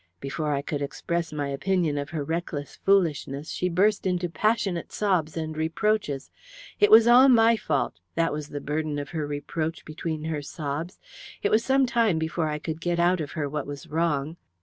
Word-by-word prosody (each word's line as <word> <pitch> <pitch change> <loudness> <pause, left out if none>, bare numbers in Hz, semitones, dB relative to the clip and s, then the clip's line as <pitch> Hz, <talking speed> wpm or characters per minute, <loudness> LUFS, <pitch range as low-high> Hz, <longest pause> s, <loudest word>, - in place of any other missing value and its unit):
Before 150 +2 -3
I 140 -1 -1
could 145 0 -3
express 170 +4 -3
my 145 -2 -3
opinion 150 +1 0
of 145 - -5
her 155 -3 -3
reckless 160 -2 -4
foolishness 155 -6 +1
she 180 - -1
burst 195 +3 +2
into 180 -1 0
passionate 200 -2 0
sobs 180 -7 0
and 160 -1 -3
reproaches. 160 -2 -1 0.5
It 415 - +5
was 225 +1 +8
all 250 +3 +8
my 230 -2 +6
fault - - -1 0.2
that 165 -2 +1
was 150 -1 -4
the 145 - -5
burden 150 +1 -2
of 145 -1 -4
her 155 -3 -3
reproach 155 +3 -4
between 155 0 -4
her 155 -2 -2
sobs. 150 +3 -5 0.4
It - - +2
was 220 +1 +4
some 270 +1 +3
time 230 -7 +2
before 160 0 -1
I 150 - -2
could 160 +1 -5
get 175 0 0
out 175 0 +3
of 145 - -5
her 150 -3 -2
what 145 -1 -4
was 145 -1 -7
wrong. 160 -1 -1
160 Hz, 190 wpm, -26 LUFS, 145-180 Hz, 0.5 s, was